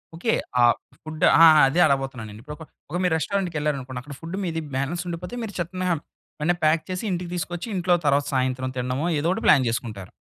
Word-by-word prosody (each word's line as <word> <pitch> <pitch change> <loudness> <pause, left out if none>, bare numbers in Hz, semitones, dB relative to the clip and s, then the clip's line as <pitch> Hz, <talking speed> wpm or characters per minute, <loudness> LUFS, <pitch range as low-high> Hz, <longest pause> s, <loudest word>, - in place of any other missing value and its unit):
Okay. 225 +7 0 0.3
ఆ - - +6 0.4
food 155 0 -6
ఆ! - - +7
ఆ! - - +11 0.2
అదే 145 +6 0
అడగబోతున్న 135 -4 -1
నేను. 105 +1 -11
ఇప్పుడు 150 +5 -8
ఒక 160 - -10 0.3
ఒక 175 - -1
మీరు 180 -3 +2
రెస్టారెంట్‌కి 180 +1 -2
వెళ్ళారనుకోండి, 135 -4 -2
అక్కడ 145 +3 -10
ఫుడ్ 170 +3 -6
మీది 165 -3 -2
బాలన్స్ 145 +7 -2
ఉండిపోతే 180 +7 -6
మీరు 215 -2 -6
చక్కున 185 +2 -3 0.6
వెంటనే 175 +4 +2
ప్యాక్ 155 +1 +3
చేసి 185 +2 -3
ఇంటికి 175 -1 -3
తీసుకొచ్చి, 175 +3 -4
ఇంట్లో 180 -1 +2
తర్వాత 145 0 +3
సాయంత్రం 130 0 0
తినడమో 125 +5 -1
ఏదోకటి 170 +5 -1
ప్లాన్ 135 -4 +6
జేసుకుంటారు. 110 -5 -4
155 Hz, 195 wpm, -24 LUFS, 135-175 Hz, 0.6 s, ఆ